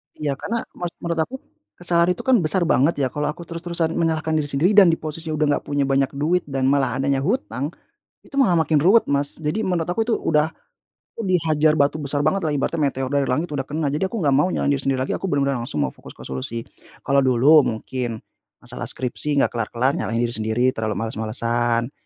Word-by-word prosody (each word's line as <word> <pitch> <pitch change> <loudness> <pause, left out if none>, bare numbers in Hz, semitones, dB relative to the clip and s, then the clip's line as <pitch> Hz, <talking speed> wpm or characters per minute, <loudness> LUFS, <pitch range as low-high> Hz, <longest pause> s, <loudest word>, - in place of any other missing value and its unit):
Iya 145 -3 -3
karena 230 +3 -3 0.2
mes 175 -1 -4
menurut 170 -1 -2
aku, - - -12 0.4
kesalahan 175 0 +1
itu 240 - -8
kan 260 -1 +4
besar 175 +1 +1
banget 160 -1 +3
ya, 130 - +2
kalau 150 +3 -2
aku 170 - -4
terus-terusan 170 -1 -3
menyalahkan 160 -1 0
diri 150 - -1
sendiri 145 +6 +2
dan 205 -2 +7
di 165 - +4
posisi 160 +1 -7
udah 150 -1 +2
nggak - - -19
punya 145 -1 0
banyak 135 0 +1
duit 165 +6 0
dan 135 -2 0
malah 140 -1 +1
adanya 135 0 +1
hutang, 135 +2 -2 0.5
itu - - -19
malah 235 -12 +3
makin 160 -2 +2
ruwet 205 +7 +5
Mas. 140 0 -1
Jadi 160 +8 -2
menurut 180 -4 -1
aku 180 +6 0
tuh 225 0 0
udah, 150 0 +1 0.6
aku 230 - -6
dihajar 155 -3 +2
batu 145 +2 +1
besar 145 0 -2
bangetlah 155 -2 +1
ibaratnya 155 +4 -1
meteor 130 -1 -4
dari 140 -1 +1
langit 150 +6 -1
udah 135 -2 -3
kena, 150 -1 -1
jadi 170 +6 0
aku 230 - -6
nggak 150 -10 +1
mau 145 +7 +3
nyalahin 145 -5 0
diri 140 - 0
sendiri 135 -1 +1
lagi, - - -3
aku 195 - -3
benar-benar 140 -5 0
langsung 75 -11 -2
fokus - - -14
ke - - -11
solusi. 90 - -5 0.4
Kalau 140 0 +3
dulu 135 +4 +5 0.2
mungkin, 120 0 -4 0.4
masalah - - -7
skripsi 140 +3 -1
nggak 140 - +2
kelar-kelar 120 +3 0
nyalahin 115 -3 -1
diri 120 - -2
sendiri 110 +2 -1
terlalu 110 -2 -3
males-malesan, 115 +2 -1
145 Hz, 205 wpm, -22 LUFS, 130-170 Hz, 0.6 s, dan